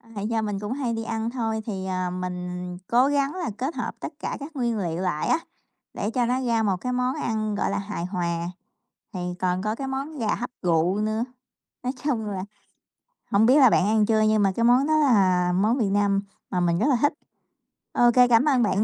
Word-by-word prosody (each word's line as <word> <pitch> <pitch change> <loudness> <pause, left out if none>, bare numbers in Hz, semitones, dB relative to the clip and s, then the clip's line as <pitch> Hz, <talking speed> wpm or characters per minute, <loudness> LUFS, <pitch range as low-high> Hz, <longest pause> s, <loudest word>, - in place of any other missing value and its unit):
Hay 205 +1 -3
do 225 -1 0
mình 205 -2 -2
cũng 210 +3 -3
hay 260 -4 -2
đi 225 0 -3
ăn 225 0 -2
thôi 225 -3 -2
thì, 195 -4 -4
à, 185 -1 -2
mình 180 0 -5
cố 245 +3 +4
gắng 285 +1 0
là 355 -6 -3
kết 270 +6 -3
hợp - - -4
tất - - -6
cả - - -4
các 295 +3 -9
nguyên 240 -4 0
liệu 175 -3 -2
lại 175 -5 -1
á, 325 - +3 0.5
để 205 - -2
cho 245 0 +1
nó 250 +2 0
ra 230 -2 +1
một 195 -3 +1
cái 250 +8 -4
món 250 +1 0
ăn, 215 -2 -2
gọi 205 - 0
là, - - -1
hài 200 -3 -4
hòa, 170 -2 -2 0.7
thì 185 - -5 0.2
còn 180 0 0
có 215 +1 -1
cái 270 +4 -5
món 275 +3 -4
gà 225 -4 0
hấp 245 +1 -4
rượu 175 +2 +2
nữa. 215 +2 0 0.6
Nói 250 - -1
chung 240 -7 0
là, 195 -2 -3 0.9
không 205 +2 +4
biết 255 +4 +6
là 265 -4 +7
bạn 185 - +3
ăn 215 0 +3
chưa 220 0 +2
nhưng 215 -1 +3
mà 195 - +3
cái 230 - 0
món 250 +4 +4
đó 310 0 +3
là 190 -11 +3
món 215 +7 +2
miền 205 -6 0
Nam 200 -1 +2 0.3
mà 180 - -1
mình 170 -1 +1
rất 235 - +2
là 275 - +4
thích. 290 - +3 0.8
Ô 240 0 +5
kê, 250 0 +6
cảm 240 +2 +4
ơn 265 -5 +3
bạn 210 -1 +2
215 Hz, 230 wpm, -25 LUFS, 190-250 Hz, 0.9 s, là